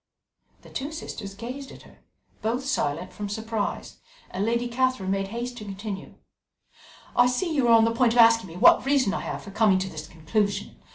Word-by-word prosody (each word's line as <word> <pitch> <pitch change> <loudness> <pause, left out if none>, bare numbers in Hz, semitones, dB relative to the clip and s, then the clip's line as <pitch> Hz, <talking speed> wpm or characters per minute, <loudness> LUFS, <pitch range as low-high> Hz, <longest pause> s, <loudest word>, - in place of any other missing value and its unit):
The - - -15
two 280 +3 -4
sisters 205 -10 -7
gazed 255 +6 -7
at - - -13
her, - - -19 0.4
both 240 +4 -1
silent 145 - -1
from 205 -1 -5
surprise, 220 0 -3 0.3
and 190 - -2
Lady 235 +2 0
Catherine 240 -5 0
made 195 0 -1
haste 240 +3 -5
to 215 - -7
continue: 200 -1 -7 1.0
"I 245 0 +6
see 315 +7 -1
you 275 -5 +2
are 230 - +6
on 225 -1 +7
the 230 - +1
point 235 0 +3
of 240 - +1
asking 230 -3 +6
me 165 - -11
what - - +6
reason 270 -7 +2
I - - -1
have - - -5
for 200 - -10
coming 210 -2 +4
to 190 0 -2
this 155 -3 -8
conclusion. 200 +6 -2
225 Hz, 195 wpm, -26 LUFS, 195-245 Hz, 1.0 s, on